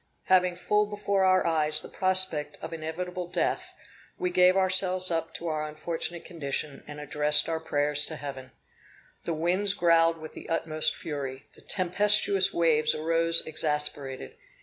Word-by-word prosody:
Having 180 -1 +2
full 210 +3 0
before 200 -2 -1
our 185 0 +3
eyes 155 -2 +1
the - - -10
prospect 185 -6 0
of 160 +1 -8
inevitable 175 +3 -5
death, 175 - -2 0.4
we 180 - -2
gave 180 +1 +4
ourselves 185 -1 +3
up 165 0 -2
to 170 - -7
our 155 -1 -2
unfortunate 165 +2 -3
condition, 145 -3 -3
and 150 0 -9
addressed 150 0 +1
our 165 -1 -2
prayers 145 -2 +1
to 160 - -6
Heaven. 135 -3 -8 0.8
The 165 - -2
winds 185 +5 +2
growled 165 -2 +3
with 155 -1 -10
the - - -11
utmost 155 -1 0
fury; 135 -3 -6
the - - -17
tempestuous 200 +1 +2
waves 160 -2 +2
arose 165 +1 +3
exasperated. 150 - -3
165 Hz, 150 wpm, -27 LUFS, 150-185 Hz, 0.8 s, gave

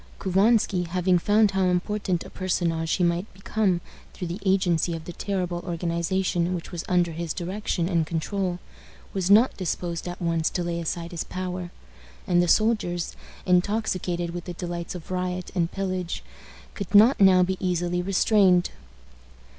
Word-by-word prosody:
Couvansky, 195 -1 +2
having 180 +1 +2
found 210 +3 +3
how 190 -1 +1
important 185 0 0
a - - -11
personage 170 -3 -1
he 185 - +1
might 175 +4 0
become 195 -2 0 0.3
through 180 - -5
the 175 +4 -4
agency 180 -4 +2
of 160 -1 -8
the 175 - -7
terrible 180 -2 -2
organization 175 +1 -1
which 170 - -7
was 170 -1 -4
under 175 -2 +2
his 165 0 -4
direction 180 -1 -2
and 170 -4 +1
control, 180 +2 -2 0.6
was 190 -2 -1
not 220 +6 +6
disposed 175 -2 -3
at 175 +1 -6
once 165 -2 0
to 180 - -2
lay 170 0 -2
aside 170 +1 -4
his 170 - -3
power; 180 -1 -5 0.6
and 175 -1 +3
the 175 - +1
soldiers, 195 -4 +1 0.3
intoxicated 180 -2 0
with 175 0 -6
the 180 - -5
delights 175 0 -5
of 175 0 -9
riot 180 -1 -3
and 170 -2 0
pillage, 185 -3 -3 0.5
could 200 0 -4
not 225 +6 +7
now 185 -2 +7
be 190 +1 0
easily 180 -1 0
restrained. 190 -1 +3
180 Hz, 155 wpm, -25 LUFS, 170-190 Hz, 0.6 s, not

